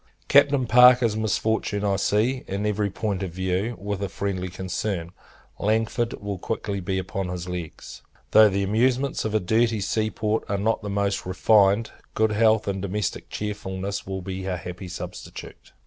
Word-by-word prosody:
Captain 140 -2 +5
Parker's 125 -1 +6
misfortune, 110 -1 0
I 100 -1 +2
see, 110 +6 +1
in 100 +2 -3
every 105 -1 0
point 100 0 -3
of 95 - -2
view, 95 +6 -1
with 100 0 -4
a 100 - -2
friendly 95 0 -3
concern. 90 -1 -3 0.5
Langford 115 +3 0
will 100 -2 -5
quickly 100 -1 -3
be 95 +1 -2
upon 95 0 -3
his 90 0 -5
legs. 90 -3 -7 0.3
Though 110 -1 +8
the 100 0 0
amusements 125 +7 +1
of 110 0 -1
a - - +4
dirty 110 +3 +1
sea 110 +2 0
port 110 0 -1
are 100 - 0
not 110 +3 0
the 105 - -5
most 100 -1 -1
refined, 100 +3 +3 0.2
good 110 0 +2
health, 110 0 +3
and 95 -1 -2
domestic 100 0 -3
cheerfulness, 100 -2 -4
will 95 -1 -4
be 95 0 -5
a 90 -1 -1
happy 90 +2 -7
substitute. 90 - -9
100 Hz, 165 wpm, -24 LUFS, 95-110 Hz, 0.5 s, Though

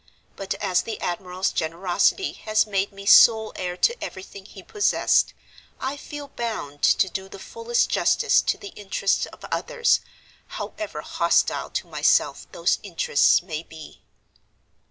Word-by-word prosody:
But 195 - -4
as 185 -3 0
the 225 - -6
admiral's 180 +1 -2
generosity 175 - 0
has 215 0 0
made 200 -1 -1
me 200 0 -11
sole 220 +1 +6
heir 180 -1 -4
to 475 - +1
everything 190 +1 -9
he 195 -2 -13
possessed, 415 - +1 0.4
I 265 +2 -3
feel 290 0 -9
bound 215 - -5
to 190 - +4
do 190 +1 -6
the 195 - -10
fullest 465 - -1
justice - - +3
to - - -1
the 405 - -9
interests 195 - -1
of - - -13
others, 475 -1 +1 0.6
however 320 - -6
hostile - - +1
to - - -3
myself - - +1
those - - 0
interests 475 - +2
may 160 -4 -5
be. 160 -2 -13
200 Hz, 140 wpm, -24 LUFS, 185-280 Hz, 0.6 s, sole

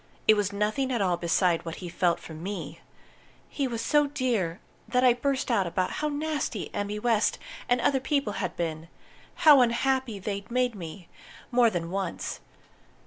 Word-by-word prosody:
It 215 - +9
was 205 -2 0
nothing 215 +6 0
at 240 - 0
all 185 -3 +2
beside 170 0 +1
what 165 -1 -5
he 180 - -7
felt 175 0 +1
for 160 - -10
me. 165 -2 -6 0.7
He 280 -2 -2
was 230 -2 -3
so 295 +3 +3
dear 230 - -1 0.3
that 250 +3 +2
I 250 -2 +7
burst 265 +1 -1
out 195 -6 +2
about 185 +2 -1
how 300 - +1
nasty 295 - -3
Emmy 205 +1 -2
West 225 0 +2 0.3
and 245 0 +3
other 270 +3 +2
people 275 -5 0
had 185 -3 -3
been 160 -1 -3 0.6
how 290 -4 +9
unhappy 250 -1 +1
they'd 200 0 -5
made 250 0 +1
me, 175 -2 -9 0.4
more 240 -1 +5
than 170 -4 -3
once. 195 -2 -3
210 Hz, 170 wpm, -27 LUFS, 180-255 Hz, 0.7 s, It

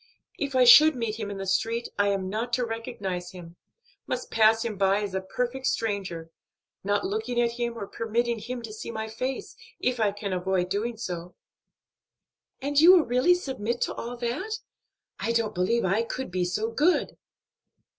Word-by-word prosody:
If 280 -2 -2
I 255 - +6
should 300 +5 +9
meet 230 -2 -3
him 210 -2 -3
in 200 - -5
the 195 - -4
street 230 +5 0
I 200 - +4
am 195 -2 0
not 225 +5 -3
to 250 0 +2
recognize 200 -6 -5
him; 175 -2 -11 0.5
must 255 - -4
pass 225 +1 +4
him 225 -3 -2
by 195 +1 +2
as 200 -2 -4
a 190 - -1
perfect 250 +7 -3
stranger, 185 -7 -2 0.5
not 205 +1 0
looking 220 +4 -2
at 235 -1 +2
him 235 0 -3
or 200 - -4
permitting 230 +2 -1
him 240 +3 -6
to 220 -2 -7
see 215 - -7
my 220 -1 -4
face, 255 +4 -4 0.2
if 250 -1 0
I 210 -2 +3
can 200 -1 -4
avoid 180 0 0
doing 220 +4 -2
so." 180 -5 -6 1.3
"And 285 +1 -2
will - - +8
you 350 0 +8
really 255 +9 +3
submit 240 - -3
to - - 0
all 240 +1 -6
that? 255 - -2 0.6
I 230 - -1
don't 225 -2 0
believe 190 +5 +1
I 195 +4 +2
could 235 -1 -5
be 180 0 0
so 215 +6 -1
good." 305 +10 +2
225 Hz, 185 wpm, -27 LUFS, 195-240 Hz, 1.3 s, should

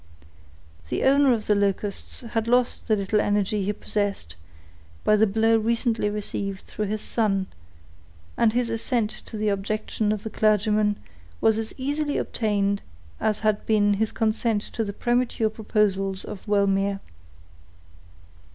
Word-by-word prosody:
The - - -1
owner 275 0 +5
of 225 -3 0
the 210 - +3
Locusts 200 0 -1
had 230 -1 -2
lost 245 +1 +1
the 220 - +3
little 205 +1 +1
energy 205 0 0
he 200 - 0
possessed, 205 - -2 0.7
by 215 - +4
the 220 +1 +4
blow 225 +2 +3
recently 230 -1 0
received 200 -2 -3
through 210 - -4
his 215 +1 -1
son, 195 -4 +1 0.9
and 230 -2 +3
his 240 0 0
assent 225 -1 0
to 220 - -8
the 210 0 0
objection 210 +1 -1
of 215 -1 -2
the 220 - -5
clergyman 210 0 +2 0.4
was 220 0 +3
as 225 +4 -5
easily 290 +2 -1
obtained 200 -2 0 0.4
as 215 -1 0
had 215 -1 +1
been 205 -2 +3
his 215 +2 0
consent 220 -1 0
to 225 - -1
the 200 - -3
premature 240 0 0
proposals 200 -3 0
of 200 - -9
Wellmere. 200 -1 +2
215 Hz, 140 wpm, -25 LUFS, 205-225 Hz, 0.9 s, owner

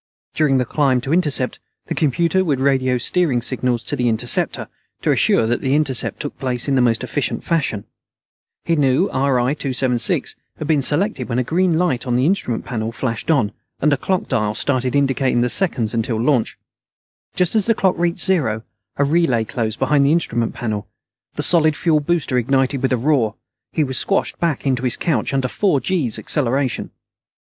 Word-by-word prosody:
During 150 -4 +2
the 125 - +1
climb 135 -3 +1
to 135 +5 -2
intercept, 150 -7 +1 0.3
the - - -3
computer 170 +5 +1
would 145 -7 0
radio 130 -2 +2
steering 140 0 +1
signals 125 -1 -1
to 135 - -3
the 125 -3 +1
interceptor, 115 +1 -1 0.4
to - - +2
assure - - +3
that 120 +2 -1
the 135 +1 +1
intercept 140 -5 0
took 145 - -5
place 125 -1 -2
in 140 - +1
the 130 - +3
most 115 -2 +1
efficient - - -2
fashion. 140 -11 -1 0.8
He 170 - +1
knew 145 +5 +2
RI 130 -1 +1
276 130 -5 0 0.2
had 155 - -5
been 150 -3 +2
selected 145 - 0
when 115 - -1
a 125 - +2
green 170 +4 +1
light 145 -8 0
on 120 - 0
the 125 +2 +2
instrument 165 - -1
panel 115 -2 -3
flashed 115 +2 -4
on, 130 -10 +2 0.3
and 150 +1 +2
a - - +1
clock 185 +7 -1
dial 105 -1 -1
started 130 -1 -1
indicating 135 -3 +1
the 125 - +1
seconds 125 - 0
until 115 -1 -1
launch. 125 -1 +1 0.8
Just 180 -1 +2
as 215 -2 +2
the 230 - +3
clock 190 -3 +2
reached 175 +1 0
zero, 130 - +1 0.3
a 140 - +2
relay 140 -6 +2
closed 110 0 -3
behind 145 -2 +2
the 140 - +3
instrument 120 -9 0
panel. 105 -3 -4 0.5
The - - 0
solid 155 -3 +4
fuel 160 -3 +2
booster 145 -4 0
ignited 135 +2 0
with 130 - 0
a 125 - +2
roar. 120 -4 +1 0.4
He 155 - +1
was 130 -2 -1
squashed 195 - -1
back 165 -5 -1
into 130 -3 +1
his 125 -1 +1
couch 165 - -1
under 135 -2 0
four 185 +1 +1
gees' 135 - -1
acceleration. 135 -2 -1
135 Hz, 185 wpm, -19 LUFS, 120-155 Hz, 0.8 s, solid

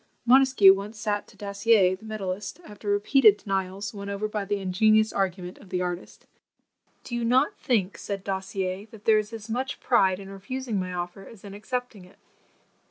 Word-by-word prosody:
Montesquieu 255 -6 +7
once 205 +3 -6
sat 210 -1 -2
to - - -19
Dassier 200 -1 +2
the 195 - -16
medallist, 205 - -5
after 210 0 -8
repeated 210 +2 +5
denials, 195 +1 -3
won 200 -1 -7
over 200 +1 -2
by 210 -1 -3
the 205 +1 -1
ingenious 215 +3 +3
argument 185 -2 -2
of 200 - -16
the 185 - -1
artist; 175 0 -6 0.8
"Do - - -9
you 240 0 -1
not 260 - +2
think," 205 -6 0
said 200 -1 -5
Dassier, 190 0 -3
"that 215 -1 -15
there 215 -1 +5
is 210 +1 -5
as 225 -1 -8
much 255 +4 -3
pride 190 -6 +2
in 195 0 -10
refusing 230 +2 -4
my 185 0 -3
offer 180 +2 -6
as 225 -4 -14
in 200 -1 -9
accepting 245 -1 -5
it?" 180 +2 -19
205 Hz, 180 wpm, -26 LUFS, 190-220 Hz, 0.8 s, Montesquieu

